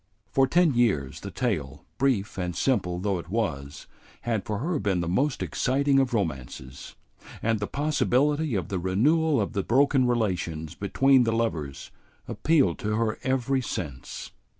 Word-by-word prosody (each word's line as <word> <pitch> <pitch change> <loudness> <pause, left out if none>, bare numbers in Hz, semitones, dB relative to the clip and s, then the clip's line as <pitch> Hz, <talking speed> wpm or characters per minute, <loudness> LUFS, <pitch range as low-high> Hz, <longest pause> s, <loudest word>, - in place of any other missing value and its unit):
For 135 0 +3
ten 170 +1 +3
years 100 - +1
the - - -7
tale, - - -3
brief 120 -7 0
and 90 -1 -3
simple 90 -7 0
though 95 0 -1
it 85 - -10
was, 75 -10 -3 0.4
had 115 -4 -2
for 105 - -2
her 155 - -1
been 95 -3 0
the 85 - -2
most 130 - 0
exciting 135 +1 +1
of 135 -1 +1
romances, 65 - -4 0.5
and 115 -1 +1
the 100 - -2
possibility 145 -1 +1
of 90 -5 -2
the 95 - -2
renewal 140 - +2
of 100 - -2
the 100 - 0
broken 130 +4 +3
relations 90 -9 -1
between 135 +6 +3
the 115 - +1
lovers 80 - -2 0.4
appealed 155 -3 +2
to 105 0 -1
her 110 -1 -1
every 130 0 0
sense. 70 - -6
115 Hz, 155 wpm, -26 LUFS, 90-135 Hz, 0.5 s, For